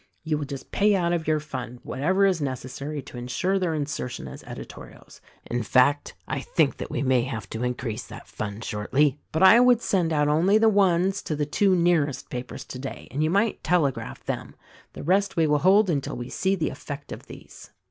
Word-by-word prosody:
You 155 -2 -1
will 145 - -3
just 140 -1 -8
pay 205 0 +3
out 175 -2 +1
of 165 -2 -2
your 155 -1 +2
fund 125 -5 -7
whatever 185 +9 +1
is 185 -5 +2
necessary 135 +2 -4
to 120 - -9
insure 180 +11 -1
their 175 -4 0
insertion 145 -4 -4
as - - -9
editorials. - - -11 0.2
In 120 0 -2
fact, 130 +6 +2
I - - -2
think - - +1
that - - -6
we - - -2
may 130 -2 +3
have 115 -6 -5
to 115 +2 -3
increase 125 -2 -3
that - - -11
fund 105 +1 -6
shortly. 135 +8 +1
But 160 - +1
I 220 +5 +9
would 245 -1 +5
send 175 -4 +1
out 150 -2 +2
only 170 +8 +4
the 220 0 +5
ones 195 -1 +2
to 155 - -3
the 150 0 -1
two 190 +6 +2
nearest 170 -5 +1
papers 125 0 -6
today 130 +1 -7
— - - -20
and 145 +3 -1
you 155 - +2
might 200 +5 +1
telegraph 160 -6 0
them. - - -4 0.4
The - - -8
rest 195 +5 +1
we 165 - +4
will 150 -1 +2
hold 195 +6 +5
until 145 -6 -1
we 120 0 -6
see 190 +1 0
the 165 -4 -1
effect 145 -1 -8
of - - -8
these." - - -12
150 Hz, 210 wpm, -25 LUFS, 130-185 Hz, 0.4 s, I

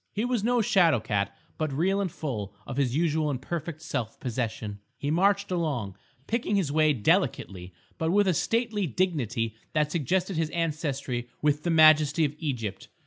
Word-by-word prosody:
He 215 +3 -1
was 245 -4 0
no 240 0 +2
shadow 170 - +4
cat, 105 -2 -1 0.3
but 155 -2 -1
real 190 +8 +1
and 190 -4 -2
full 105 -11 -5
of 130 - -6
his 130 -3 +1
usual 155 -1 +1
and 135 -4 -2
perfect 160 +2 -5
self 125 -8 -4
possession. 110 -4 -3 0.2
He 145 - -2
marched 200 +4 +2
along, 140 - -1 0.3
picking 225 0 -1
his 180 -8 +1
way 155 0 +4
delicately, 100 -6 0 0.3
but 160 - 0
with 200 +3 +3
a 185 - +4
stately 225 +2 0
dignity 120 - -1 0.2
that 150 -1 +1
suggested 180 +4 0
his 160 -1 0
ancestry 145 -7 -2
with 150 0 +2
the 175 - -2
majesty 155 -1 +6
of 145 - -2
Egypt. 125 - -4
155 Hz, 170 wpm, -27 LUFS, 125-180 Hz, 0.3 s, majesty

